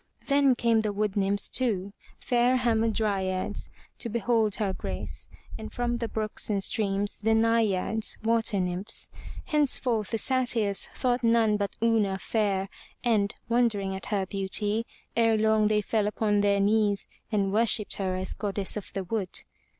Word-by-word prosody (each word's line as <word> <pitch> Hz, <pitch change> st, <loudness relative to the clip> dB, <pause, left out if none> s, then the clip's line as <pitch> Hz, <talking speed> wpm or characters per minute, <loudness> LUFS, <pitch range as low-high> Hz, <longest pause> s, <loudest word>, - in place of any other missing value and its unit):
Then 280 Hz, -2 st, +4 dB
came 230 Hz, -2 st, +2 dB
the 215 Hz, -1 st, -1 dB
wood 205 Hz, -1 st, -1 dB
nymphs, 200 Hz, 0 st, 0 dB
too, 200 Hz, -6 st, 0 dB, 0.3 s
fair 245 Hz, +1 st, +2 dB
Ham 235 Hz, -3 st, +2 dB
a 230 Hz, -, +2 dB
dry'ads, 195 Hz, -4 st, -2 dB, 0.3 s
to 235 Hz, -, -3 dB
behold 225 Hz, -2 st, +1 dB
her 200 Hz, -4 st, -1 dB
grace, -, -, -6 dB, 0.3 s
and 220 Hz, -, -7 dB
from 240 Hz, 0 st, -1 dB
the 235 Hz, -1 st, -2 dB
brooks 215 Hz, 0 st, -3 dB
and 200 Hz, -2 st, 0 dB
streams, 200 Hz, -1 st, -1 dB
the 220 Hz, +1 st, +2 dB
Nai'ads, 220 Hz, -2 st, +1 dB
water 225 Hz, -2 st, +2 dB
nymphs. 180 Hz, +4 st, -1 dB, 0.3 s
Henceforth 255 Hz, -, 0 dB
the 225 Hz, -, -1 dB
Satyrs 235 Hz, -5 st, +1 dB
thought 245 Hz, -1 st, 0 dB
none 230 Hz, -2 st, +4 dB
but 200 Hz, -1 st, -3 dB
Una 215 Hz, -4 st, +2 dB
fair, 195 Hz, -1 st, 0 dB, 0.4 s
and, 220 Hz, -3 st, +1 dB
wondering 225 Hz, -5 st, +1 dB
at 190 Hz, -, -7 dB
her 200 Hz, -3 st, 0 dB
beauty, 205 Hz, +4 st, -1 dB, 0.3 s
ere 225 Hz, -1 st, +3 dB
long 215 Hz, 0 st, +3 dB
they 210 Hz, 0 st, +2 dB
fell 210 Hz, 0 st, 0 dB
upon 210 Hz, -1 st, +1 dB
their 200 Hz, 0 st, +2 dB
knees 205 Hz, 0 st, +2 dB, 0.2 s
and 200 Hz, -2 st, +1 dB
worshipped 220 Hz, -1 st, +3 dB
her 190 Hz, -2 st, -1 dB
as 185 Hz, 0 st, -3 dB
Goddess 200 Hz, -2 st, -2 dB
of 210 Hz, -, -6 dB
the 195 Hz, -, -3 dB
Wood. 190 Hz, -1 st, -3 dB
215 Hz, 160 wpm, -27 LUFS, 200-230 Hz, 0.4 s, Then